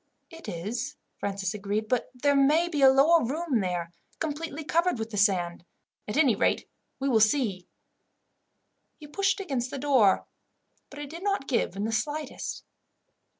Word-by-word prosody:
"It 330 0 -9
is," 225 - -4 0.2
Francis 195 -2 -2
agreed; 210 +1 -2
"but 250 +1 0
there 285 +3 +2
may 300 +5 +4
be 305 -5 -2
a 270 - +9
lower 295 +5 +5
room 285 +1 -1
there, 175 -3 -2 0.3
completely 315 0 -4
covered 335 +1 +1
with 225 0 -5
the 205 - -4
sand. 180 -4 +1 0.4
At 210 - -3
any 280 -7 +5
rate, - - +1 0.3
we 275 - -1
will 240 -5 +4
see." 215 -5 +1 1.3
He 300 - -12
pushed 385 +6 0
against 265 -10 -2
the 280 - -5
door, 260 -8 +3 0.6
but 285 - -12
it 290 -1 -7
did 335 +2 -8
not 395 -8 -1
give 235 -7 0
in 200 - -3
the 220 - -1
slightest. 295 +5 -3
270 Hz, 160 wpm, -27 LUFS, 210-305 Hz, 1.3 s, a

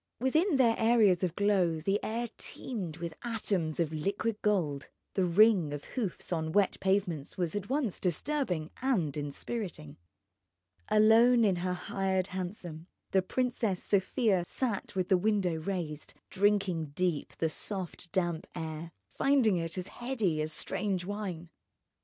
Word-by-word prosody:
Within 310 - +2
their 245 -4 +5
areas 220 -6 +4
of 175 -2 0
glow 190 -6 +2
the 195 +6 0
air 235 +2 -2
teemed 185 -11 -5
with 170 -1 -5
atoms 200 -9 -1
of 160 -2 0
liquid 200 +7 -2
gold. 165 -10 0 0.2
The 190 - +2
ring 180 -4 +5
of 145 - -5
hoofs 205 -7 -3
on 160 -1 -2
wet 200 -2 +2
pavements 190 -7 0
was 175 0 -1
at 205 +1 -3
once 265 - 0
disturbing 180 - 0
and 195 - +1
inspiriting. 145 - -5 0.9
Alone 225 +2 +6
in 190 -3 +2
her 180 +1 -1
hired 190 +1 -1
hansom 175 -3 -5 0.2
the 190 - +4
Princess 225 -2 -1
Sofia 200 -1 +2
sat 215 +1 -3
with 185 -1 0
the 190 - +5
window 195 -4 +1
raised, 160 -3 -4 0.2
drinking 185 -7 +1
deep 175 -4 -1
of - - -22
the 160 - +1
soft 180 0 -4
damp 175 -4 -1
air, 160 0 -5 0.2
finding 260 -9 +3
it 165 +1 -3
as 185 +2 -4
heady 225 -11 -1
as 155 +1 -2
strange 190 +1 -2
wine. 185 -5 -5
190 Hz, 145 wpm, -31 LUFS, 165-215 Hz, 0.9 s, Alone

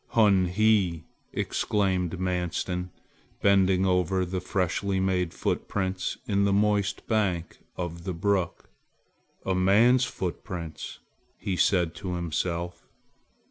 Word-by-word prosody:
"Hun 100 -5 +5
he!" 95 -4 +2 0.3
exclaimed 95 -3 0
Manstin, 90 0 -2 0.5
bending 95 -2 +4
over 90 0 +2
the 90 +1 -3
freshly 95 +2 -1
made 90 -2 +1
footprints 95 -1 -2
in 100 -1 +2
the 100 - +3
moist 100 0 +1
bank 95 -7 -1 0.2
of 85 -1 -4
the 95 - -3
brook. 95 0 -1 0.7
"A 95 - +1
man's 110 +8 +4
footprints!" 85 -4 -5 0.4
he 95 - -2
said 90 -2 +2
to 90 -2 -4
himself. 85 +1 -3
95 Hz, 105 wpm, -27 LUFS, 90-100 Hz, 0.7 s, Hun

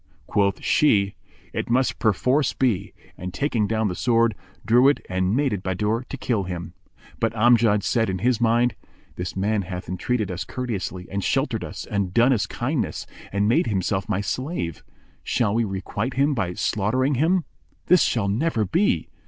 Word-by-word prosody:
Quoth 100 +1 0
she, 100 -9 +3 0.4
"It - - -3
must 130 +1 +1
perforce 125 +6 +2
be;" 120 -8 0 0.3
and, 90 +1 -5
taking 120 -7 0
down 110 0 0
the 90 - -2
sword, 115 +2 +2 0.3
drew 120 +4 +5
it 145 - +3
and 95 +2 0
made 140 -2 +1
at 100 - -3
Bahadur 105 +6 -1
to 135 - -5
kill 115 -6 -1
him; 90 -1 -6 0.5
but 115 0 0
Amjad 110 -2 +4
said 115 -3 +1
in 95 - -1
his 120 +4 +1
mind, 120 +1 +3 0.4
"This 90 0 -5
man 105 +2 +1
hath 90 -1 -6
entreated 100 +3 -1
us 90 - -3
courteously 100 -7 -4
and 100 0 -2
sheltered - - 0
us - - -6
and 100 -3 -2
done 120 +3 +5
us 110 - 0
kindness - - -2 0.3
and 100 +1 +1
made 120 +2 +3
himself 95 0 -1
my 100 -1 0
slave: 130 - -3 0.4
shall 110 -4 +1
we 115 +1 +2
requite 100 +5 -3
him 140 +2 +2
by 95 -8 -2
slaughtering 125 +7 0
him? 175 +2 +3 0.4
This 180 0 +5
shall 110 -5 +1
never 115 +2 0
be!" 200 - +1
110 Hz, 170 wpm, -24 LUFS, 95-125 Hz, 0.5 s, drew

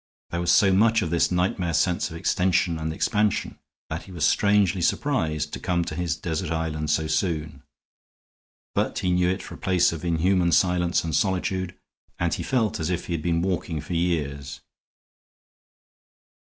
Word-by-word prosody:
There 85 - -2
was 85 0 +2
so 95 +2 +5
much 110 +3 +4
of 80 - -3
this 85 - +2
nightmare 90 -2 0
sense 90 +4 +1
of 80 - -7
extension 90 -1 +1
and 80 0 -2
expansion 105 +5 0 0.3
that 80 +1 -4
he 95 - -13
was 85 -4 -1
strangely 100 -1 +3
surprised 80 - 0
to - - -4
come 85 -2 0
to - - -5
his 85 0 -1
desert 85 -1 -3
island 80 -1 -2
so 80 +2 +1
soon. 80 -3 -2 1.1
But - - 0
he 90 - 0
knew 90 0 +2
it 95 - -2
for - - -9
a - - -11
place 90 -2 +2
of 80 - -7
inhuman 85 +1 +2
silence 90 -1 +2
and 80 -3 -2
solitude; 95 -1 -1 0.4
and 85 -1 0
he - - -2
felt 115 -6 0
as 80 +1 -2
if 90 -1 -2
he 85 - -4
had 80 - -2
been 85 0 0
walking 90 -3 -2
for 75 +4 -6
years. 75 -5 -2
85 Hz, 175 wpm, -25 LUFS, 80-95 Hz, 1.1 s, so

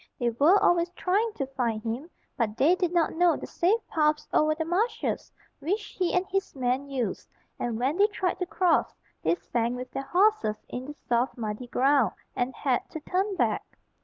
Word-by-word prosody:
They 240 -2 +1
were 295 - +5
always 345 0 +3
trying 410 +6 +1
to 275 - -2
find 240 -5 -2
him, 240 +8 -4 0.3
but 220 -2 -1
they 290 +8 +5
did 360 -2 0
not 345 -2 +2
know 345 0 +3
the - - -6
safe 390 +7 +1
paths 300 -1 +1
over 310 0 +3
the 320 0 -2
marshes 380 +8 -1 0.3
which 405 +7 -2
he 360 -2 +2
and 360 +1 +2
his 390 -2 -2
men 260 +2 -1
used, 250 -7 -3 0.3
and 235 -2 -2
when 265 +7 0
they 405 +1 +6
tried 380 -4 -2
to 360 - -2
cross, 360 -2 +2 0.3
they - - +2
sank 235 -7 -1
with 250 0 -7
their - - -3
horses 355 - +2
in 250 +1 -5
the 295 - -7
soft 245 -1 -1
muddy 220 +1 -4
ground, 270 +1 +3 0.2
and 245 +1 -1
had 260 -4 0
to 315 - -6
turn 380 +5 -1
back. - - -1
300 Hz, 190 wpm, -27 LUFS, 245-360 Hz, 0.3 s, they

